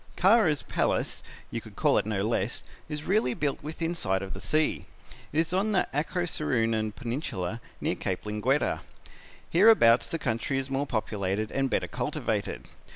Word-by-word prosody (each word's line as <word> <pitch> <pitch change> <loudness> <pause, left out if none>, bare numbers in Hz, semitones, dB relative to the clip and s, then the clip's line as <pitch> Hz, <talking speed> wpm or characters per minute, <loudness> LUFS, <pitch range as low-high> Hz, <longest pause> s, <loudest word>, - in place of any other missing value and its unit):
"Kara's, 190 -6 +4
palace, - - 0 0.3
you - - -3
could - - -13
call - - +3
it - - -3
no 100 -3 0
less, 110 0 0 0.3
is 150 -1 -4
really 190 - +1
built 145 -2 -1
within 165 +3 -3
sight 95 - -1
of 95 - -6
the 95 - -7
sea. 155 +9 +1 0.5
It 150 - +1
is 165 +1 -3
on 205 +3 +1
the 185 - +2
Acroceraunian 125 - 0
Peninsula 115 - -3 0.2
near - - 0
Cape 95 +2 -3
Linguetta. 105 +7 +1 0.7
Hereabouts 170 - +6
the 165 - -2
country 125 -1 -1
is 135 0 -3
more 140 +2 0
populated 105 -3 -1
and 135 -1 0
better - - 0
cultivated. - - -2
135 Hz, 155 wpm, -28 LUFS, 110-160 Hz, 0.7 s, Hereabouts